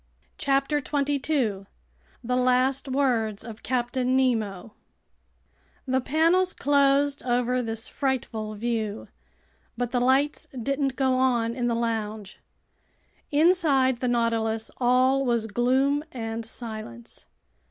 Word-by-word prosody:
CHAPTER 275 +1 +1
22 275 -8 -1 0.6
The 250 +2 -1
Last 255 +2 +2
Words 240 -6 0
of 225 -2 -9
Captain 255 +1 0
Nemo 220 -5 -1 1.1
THE 260 -1 +1
PANELS 335 +7 +2
CLOSED 280 0 +2
over 250 0 0
this 225 0 -3
frightful 225 -5 -3
view, 220 -1 -3 0.7
but 245 0 -2
the 250 - +1
lights 270 +4 +1
didn't 275 +2 -1
go 260 -1 +1
on 240 -3 +1
in 245 0 -2
the 235 - 0
lounge. 220 -3 -3 0.9
Inside 290 -6 +3
the 250 - -1
Nautilus 225 -2 0
all 255 +2 +3
was 235 -3 0
gloom 260 +6 +1
and 225 -2 -5
silence. 215 - -8
250 Hz, 110 wpm, -25 LUFS, 225-275 Hz, 1.1 s, Inside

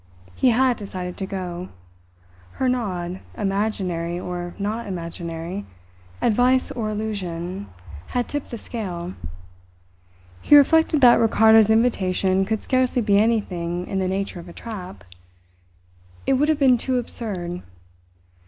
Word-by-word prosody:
He 260 - +3
had 250 0 +3
decided 185 -3 -6
to 190 - -4
go. 180 -2 -5 0.8
Her 260 - -1
nod, 185 -8 -2 0.2
imaginary 195 -4 -1
or 175 -1 -5
not 215 +3 -3
imaginary, 170 +1 -5 0.6
advice 250 +3 +3
or 220 -3 -3
illusion, 195 -3 -4 0.4
had 245 -1 -1
tipped 290 -1 -4
the 235 - -5
scale. 185 -6 -5 1.3
He 295 - +6
reflected 310 +1 +5
that 245 -2 +7
Ricardo's 220 -1 +5
invitation 195 -4 +2
could 220 +1 -2
scarcely 255 -2 +1
be 200 -1 +4
anything 180 -6 0
in 195 - -2
the 190 - 0
nature 195 -1 -2
of 170 +1 -10
a - - -11
trap. 180 - -8 1.2
It - - +3
would 290 +4 +2
have 310 - +3
been 260 -4 +4
too 260 +1 0
absurd. 185 -7 -4
200 Hz, 125 wpm, -23 LUFS, 180-235 Hz, 1.3 s, that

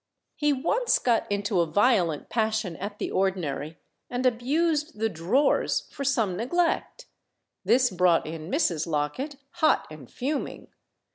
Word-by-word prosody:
He 295 -1 +1
once 345 - +1
got 235 -4 0
into 200 -1 0
a 170 - +2
violent 180 - +2
passion 220 -6 -1
at 205 +2 -6
the - - -3
ordinary, 165 -5 -1 0.3
and 250 +1 -2
abused 295 +5 +1
the 225 +1 0
"drawers" 195 - +1
for 280 - -5
some 230 -9 +1
neglect. 335 - -1 0.6
This 250 -1 +3
brought 180 -2 +3
in 160 +1 -6
Mrs. 175 - 0
Locket, 155 - -2 0.2
hot 315 -3 +2
and 150 -5 -11
fuming. 280 +4 -4
220 Hz, 135 wpm, -26 LUFS, 170-275 Hz, 0.6 s, This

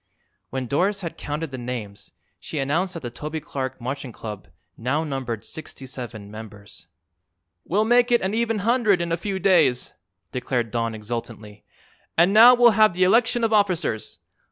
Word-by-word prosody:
When 130 0 -3
Doris 195 - 0
had 170 -3 -5
counted 150 +1 -5
the 130 - -6
names 120 -5 -6 0.3
she 155 - -7
announced 165 +7 0
that 165 - -5
the 120 - -5
Toby 155 +5 -5
Clark 130 -3 -5
Marching 130 +1 -5
Club 105 -4 -8 0.3
now 140 +7 -1
numbered 130 -7 -4
sixty 150 -3 -7
seven 120 -6 -8
members. 105 -5 -11 0.8
"We'll 210 +5 +1
make 245 +1 +4
it 240 - +4
an 190 +2 -1
even 225 0 0
hundred 230 -5 +3
in 170 -1 -2
a - - +3
few 195 +3 -3
days," 165 -10 +3 0.4
declared 125 -3 -2
Don 115 -1 -1
exultantly. 110 -1 -7 0.5
"And 175 +4 +5
now 235 +4 +9
we'll 240 -1 +6
have 215 -2 +4
the 185 - +2
election 230 +5 +3
of 225 -1 +2
officers. 180 - 0
150 Hz, 165 wpm, -23 LUFS, 120-195 Hz, 0.8 s, now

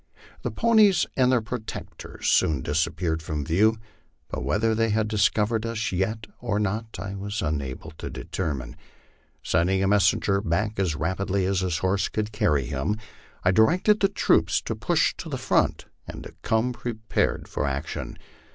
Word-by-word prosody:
The - - -2
ponies 220 -5 +4
and 130 -1 +4
their 125 -3 +2
protectors 110 0 -6
soon 75 -5 +3
disappeared 80 +2 0
from 75 -2 -3
view, 105 +7 +3 0.5
but 70 - -4
whether 105 - +1
they 115 0 +1
had 110 0 +1
discovered 110 +1 +1
us 115 -1 -2
yet 110 +4 -1
or 110 -4 -1
not 105 +2 -2
I 95 +1 -5
was 100 +3 -4
unable 75 0 -3
to - - -5
determine. 70 -9 -4 0.7
Sending 95 +4 +2
a - - +2
messenger 100 -1 +3
back 105 +3 -1
as 90 -5 +1
rapidly 95 +3 -1
as 95 0 +1
his 90 -4 0
horse 95 +2 0
could 110 0 -2
carry 75 - +1
him, 70 - -1 0.5
I 90 - +4
directed 180 - +4
the 195 - +3
troops - - +3
to - - -3
push - - +2
to - - -7
the - - -3
front, - - +1 0.2
and - - -7
to - - -10
come 115 +3 +1
prepared 115 -2 -2
for 75 - -2
action. 70 +1 -4
100 Hz, 160 wpm, -25 LUFS, 85-110 Hz, 0.7 s, ponies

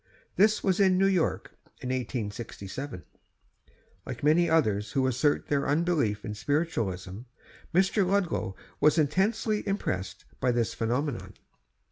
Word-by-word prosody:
This 215 +2 +3
was 190 -1 +1
in 190 -2 +4
New 195 - +4
York, 185 -4 +1 0.3
in 125 - -5
1867. 120 - -4 1.0
Like 125 +5 -7
many 165 +3 +4
others 105 -10 +1
who 135 -1 +2
assert 130 +3 +1
their 140 -1 0
unbelief 145 -9 +1
in 105 - -4
spiritualism, 110 - -2 0.5
Mr. 190 +3 +3
Ludlow 180 - 0 0.2
was 150 +2 +4
intensely 210 +8 +1
impressed 95 - -3
by 125 - +2
this 120 -2 0
phenomenon. 125 +3 -2
145 Hz, 120 wpm, -28 LUFS, 110-180 Hz, 1.0 s, in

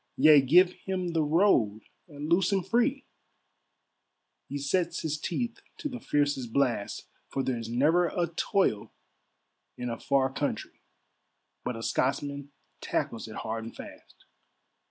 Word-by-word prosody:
Yea, 150 0 +8
give 175 +7 +5 0.2
him 185 -2 -1
the 165 -1 +1
road 150 - +3 0.3
and 145 -2 -7
loose 175 +4 +3
him 195 -2 +1
free, 245 +7 +1 1.4
He 145 - -4
sets 170 +5 -1
his 155 -1 -2
teeth 235 +9 -3 0.2
to - - -3
the 250 -2 -6
fiercest 145 - 0
blast, 120 -6 0 0.2
For 135 - -2
there's 115 -4 -2
never 155 +9 +3
a 175 +1 0
toil 175 - 0 0.8
in 125 -1 -3
a 115 - -5
far 135 -1 +1
countrie, - - -3 0.8
But 125 - -3
a 115 - -7
Scotsman 140 +2 -1 0.3
tackles 115 -1 -2
it 110 - -9
hard 115 0 -4
and 115 - -9
fast. - - -13
145 Hz, 135 wpm, -28 LUFS, 125-175 Hz, 1.4 s, Yea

